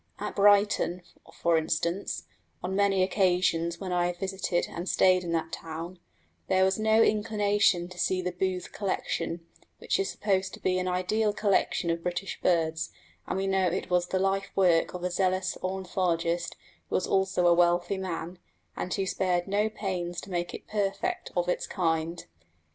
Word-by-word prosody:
At - - -5
Brighton, 200 -3 +3 0.3
for 170 -1 +2
instance, 170 +4 -2 0.4
on 185 +2 -2
many 195 -1 +3
occasions 175 -3 +1
when 190 -2 -5
I 175 0 +2
have 175 0 -4
visited 190 -1 -1
and 175 +2 -5
stayed 185 -1 +4
in 170 - -4
that 160 -1 -1
town, 165 +2 -6 0.5
there 190 0 +4
was 190 +2 +1
no 220 +1 +4
inclination 205 -4 +2
to 180 0 -11
see 185 - +1
the 180 0 -2
Booth 180 0 -2
Collection, 175 -4 -3 0.3
which - - -1
is 195 - 0
supposed 190 -2 -1
to - - -16
be 185 0 +1
an 185 - -2
ideal 195 +4 +1
collection 195 -4 +1
of 165 0 -2
British 180 +3 -4
birds; 160 -2 +1 0.4
and - - -2
we 195 - -1
know 190 -1 +2
it 180 +1 -2
was 180 0 +2
the 190 - -1
life 195 +1 0
work 180 -3 +3
of 180 - -6
a 180 - -1
zealous 185 0 0
ornithologist 175 -2 -1 0.3
who - - -1
was 185 - +1
also 190 -2 +1
a 175 - +7
wealthy 175 +2 +2
man, 175 -1 -5 0.4
and 180 - -4
who 195 -2 -1
spared 180 -1 0
no 205 +2 +1
pains 180 -5 -3
to 195 - -11
make 175 -1 -2
it - - -10
perfect 200 -2 -2
of 175 0 +1
its 180 - -1
kind. 165 -1 -1
185 Hz, 175 wpm, -28 LUFS, 175-195 Hz, 0.5 s, a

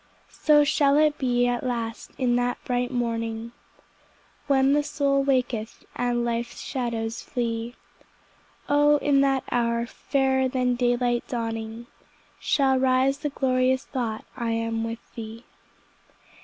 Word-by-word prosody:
So 295 -1 +6
shall 285 -1 +3
it 300 -1 +3
be 245 -2 +2
at 245 0 0
last 230 -3 -3
in 245 -2 +1
that 245 0 0
bright 245 0 0
morning, 230 -2 -2 1.0
When 270 0 +4
the 295 - +3
soul 280 -1 +1
waketh, 250 -5 -1
and 240 -1 0
life's 235 0 -3
shadows 230 -3 -3
flee; 235 -1 -3 0.9
O 290 +1 +4
in 285 -1 +3
that 270 -1 +2
hour, 235 -1 +1
fairer 265 +1 0
than 255 -1 0
daylight 245 0 +1
dawning, 225 -1 -4 0.5
Shall 265 -2 +2
rise 265 +1 +2
the 295 - -2
glorious 260 -1 +1
thought 230 -5 -3
I 235 -2 -2
am 225 0 -1
with 230 0 -7
Thee. 225 +1 -8
245 Hz, 130 wpm, -25 LUFS, 235-270 Hz, 1.0 s, So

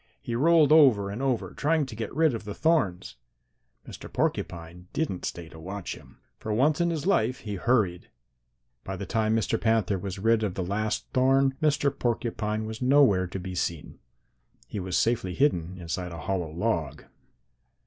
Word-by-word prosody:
He 120 - -5
rolled 155 +4 +4
over 125 -11 +5
and 110 +6 -5
over 130 -3 -1
trying 155 0 +1
to 125 -4 -9
get 110 0 -4
rid 160 -3 +3
of 115 - -5
the 105 -1 -6
thorns. 150 - 0 0.7
Mr. - - -10
Porcupine 85 +1 -3
didn't 140 - -2
stay 85 -2 -5
to 80 - -13
watch 95 +3 -5
him. - - -15 0.2
For 110 - -4
once 145 +9 +2
in 170 - +2
his 160 -2 -3
life 135 - +1
he 105 - -5
hurried. 100 -4 0 0.7
By - - -5
the - - -5
time 110 -1 +1
Mr. 115 0 0
Panther 110 -4 +1
was 95 +1 -5
rid 115 +3 +2
of 100 -4 -2
the 95 - -2
last 105 +4 -2
thorn, 135 +1 +3
Mr. 145 -2 +2
Porcupine 110 -2 -2
was 110 +2 -7
nowhere 125 -9 +4
to 95 - -6
be 95 +1 -6
seen. 85 -3 -4 0.7
He 105 - -6
was 95 -1 -2
safely 110 -6 0
hidden 95 - +1
inside 90 0 -4
a 85 -1 -7
hollow 90 0 -2
log. 85 -2 -2
110 Hz, 175 wpm, -27 LUFS, 95-135 Hz, 0.7 s, over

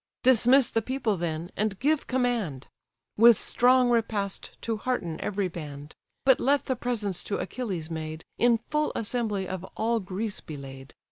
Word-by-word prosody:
Dismiss 255 +1 +5
the 225 - +1
people, 240 -3 -1
then, 165 0 -3
and 210 -2 -1
give 295 +5 +1
command, 235 - -1 0.5
With 230 0 +8
strong 250 0 +4
repast 215 -4 -1
to 225 -1 -1
hearten 210 -9 -2
every 200 -1 -1
band; 150 -3 -8 0.3
But 265 -2 +6
let 280 +2 +2
the 260 - 0
presents 220 -6 -2
to 200 - -2
Achilles 185 -10 -4
made, 155 0 -5
In 240 -1 +5
full 300 +6 -1
assembly 210 -4 -1
of 185 -1 -5
all 230 +1 +1
Greece 200 +2 -3
be 155 - -8
laid. 135 0 -10
215 Hz, 155 wpm, -27 LUFS, 175-245 Hz, 0.5 s, With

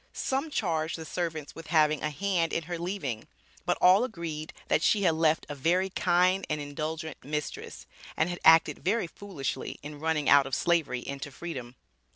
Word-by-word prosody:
Some 270 +4 -1
charged 165 - -1
the 160 - -7
servants 160 -4 -4
with 165 -1 -10
having 155 -2 +3
a 155 - 0
hand 170 +2 0
in 165 - 0
her 170 +1 -5
leaving, 165 - -4 0.4
but - - +2
all 185 +5 +6
agreed 170 -9 -5 0.2
that - - +2
"she 205 +3 +3
had 170 -3 +4
left 160 0 +2
a - - -5
very 175 +7 +1
kind 180 +2 +2
and 150 - -1
indulgent 155 +2 -5
mistress," 150 +2 -5 0.3
and 160 - +2
had 175 0 -4
acted 160 0 +6
very 205 +3 +1
foolishly 170 -5 -5
in 145 0 -8
running 155 -2 0
out 140 -1 +6
of 135 - -1
Slavery 165 -8 +1
into 140 +2 -6
Freedom. 130 -5 -7
160 Hz, 180 wpm, -29 LUFS, 150-180 Hz, 0.4 s, all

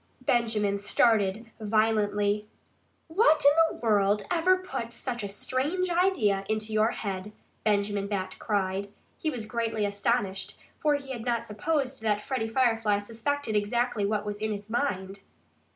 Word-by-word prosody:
Benjamin 215 -5 +1
started 215 +1 +2
violently. 210 -1 +1 0.6
"What 320 -4 +4
in 285 - +9 0.2
the - - -9
world 205 -1 +3
ever 360 +2 +4
put 370 -11 -5
such 240 -1 -4
a 200 - -3
strange 295 - -1
idea 310 - +2
into 215 0 -1
your 215 +1 +3
head?" 200 -1 -4 0.3
Benjamin 205 -1 +1
Bat 190 -2 -3
cried. 200 -2 -1 0.3
He 315 - -1
was 245 -7 -4
greatly 225 -1 -1
astonished, 200 -1 -1 0.2
for 300 -1 +3
he 275 -2 -6
had 240 -4 -5
not 235 -1 -1
supposed 265 +4 -2
that 210 -1 0
Freddie 255 -4 -2
Firefly 225 -4 +2
suspected 230 +4 -2
exactly 235 +2 0
what 210 0 -1
was 205 0 -3
in 215 +1 -2
his 205 +1 -6
mind. 200 -7 -1
220 Hz, 145 wpm, -28 LUFS, 205-250 Hz, 0.6 s, in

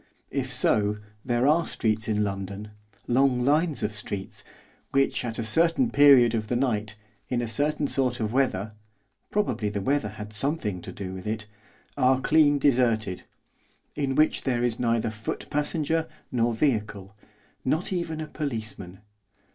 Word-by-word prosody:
If 135 -2 -2
so, 105 -4 +2 0.3
there 120 0 +1
are 155 +4 +3
streets 110 -1 0
in 105 -1 +1
London, 100 +1 -5 0.4
long 125 0 +2
lines 155 +2 +2
of 105 - -1
streets, 100 -2 -5 0.5
which, 135 -1 +1
at 115 -2 -4
a 115 - -2
certain 165 - +2
period 135 -5 +7
of 110 -2 -1
the 120 - -1
night, 110 -4 0 0.3
in 125 - 0
a 120 - -2
certain 145 +6 0
sort 130 -3 0
of 110 0 -2
weather 110 -6 0 0.6
probably 120 - 0
the 100 0 -3
weather 130 +1 0
had 105 +1 -9
something 105 - -2
to - - -8
do 95 -2 -6
with 95 +1 -7
it 110 0 -2 0.5
are 130 -1 +4
clean 145 +1 +4
deserted; 120 -8 +1 0.7
in 135 -2 -1
which 155 +2 +3
there 120 -2 0
is 120 0 0
neither 115 -2 +1
foot 110 -1 -5
passenger 155 +2 0 0.2
nor 120 -1 +1
vehicle, 105 -5 -1 0.5
not 160 +8 0
even 170 -3 -3
a 155 - -4
policeman. 110 - -4
120 Hz, 155 wpm, -26 LUFS, 105-145 Hz, 0.7 s, period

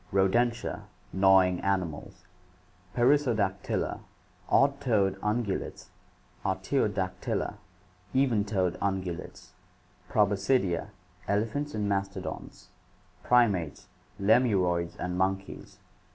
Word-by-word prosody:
Rodentia, 115 +5 +1 0.3
gnawing 95 -1 +5
animals. 90 -6 -3 0.7
Perissodactyla, 120 -7 +1 0.5
odd 140 0 +3
toed 105 -8 +2
ungulates. 105 -1 -2 0.5
Artiodactyla, 95 0 -1 0.5
even 130 -6 +2
toed 95 -4 -1
ungulates. 95 -3 -4 0.6
Proboscidea, 100 -3 +1 0.4
elephants 115 +7 -1
and 105 -1 -1
mastodons. 100 -1 -4 0.5
Primates, 100 -11 +2 0.3
lemuroids 95 -6 +2
and 90 0 -3
monkeys. 95 +1 -2
100 Hz, 70 wpm, -28 LUFS, 95-115 Hz, 0.7 s, gnawing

